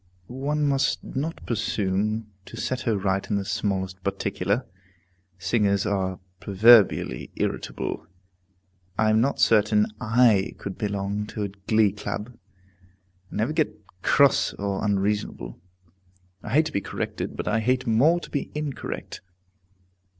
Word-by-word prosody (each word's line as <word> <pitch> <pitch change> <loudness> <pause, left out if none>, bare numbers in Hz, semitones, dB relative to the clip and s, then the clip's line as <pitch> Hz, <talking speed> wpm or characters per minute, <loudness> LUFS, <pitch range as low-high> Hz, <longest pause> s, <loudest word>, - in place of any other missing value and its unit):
One 140 +6 -1
must 140 +1 +1
not 155 +5 -4
presume 105 -1 -1 0.2
to - - -10
set 130 -1 -2
her 110 - +2
right 95 0 -1
in 105 - +1
the 100 -1 -1
smallest 95 -2 -2
particular. 100 +3 -1 0.7
Singers 100 +1 +1
are 95 -3 -1 0.2
proverbially 100 - +4
irritable! - - -3 0.9
I 110 0 +3
am 110 +1 +4
not 140 +3 0
certain 105 -1 +4 0.2
I 110 -3 +3
could 100 -1 -6
belong 100 0 -2
to 105 - -4
a 100 - -2
glee 100 +2 +2
club, 105 +3 -6 0.9
and - - -6
never 115 +8 0
get 155 -1 0 0.2
cross 140 +5 +4
or 100 -1 -2
unreasonable. 105 -1 -1 0.8
I 110 - -6
hate 155 +3 +5
to 155 - -4
be 100 - -1
corrected; 95 - -4
but - - -4
I 110 +1 +2
hate 125 +3 +1
more 135 +10 +4
to - - -9
be 145 - -2
incorrect. 150 -2 -5
105 Hz, 135 wpm, -25 LUFS, 100-125 Hz, 0.9 s, hate